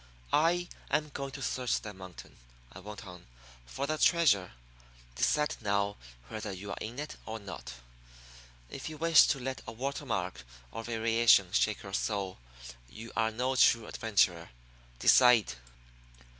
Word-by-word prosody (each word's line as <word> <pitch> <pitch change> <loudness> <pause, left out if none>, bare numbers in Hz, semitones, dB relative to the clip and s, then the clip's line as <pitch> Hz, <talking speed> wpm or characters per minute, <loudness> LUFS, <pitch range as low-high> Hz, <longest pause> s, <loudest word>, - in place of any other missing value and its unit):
"I 175 +3 +3 0.2
am 150 0 0
going 140 -1 -5
to 135 -1 -6
search 125 -2 0
that 105 -3 -8
mountain," 95 -2 -12 0.4
I 90 - -10
went 105 +1 -9
on, 90 -2 -12 0.4
"for 135 - -3
the 155 +1 -2
treasure. 120 - +3 0.6
Decide 150 - +1
now 100 -1 0 0.3
whether 105 - -5
you 100 +2 -7
are - - -5
in 115 +3 -6
it 150 +1 -6
or 110 0 -4
not. 95 - -8 0.9
If 135 - -7
you 155 - -8
wish 165 0 +6
to 135 - 0
let 130 +1 -4
a - - -5
water 140 +5 -4
mark 90 - -3 0.3
or - - -5
a - - -11
variation 115 -4 +3
shake 110 0 +1
your 100 -1 -9
soul, 100 - -2 0.5
you 115 - -10
are 110 0 +2
no 125 +4 -1
true 115 -2 +4
adventurer. 90 -8 +1 0.5
Decide." 120 - +5
110 Hz, 155 wpm, -31 LUFS, 100-135 Hz, 0.9 s, wish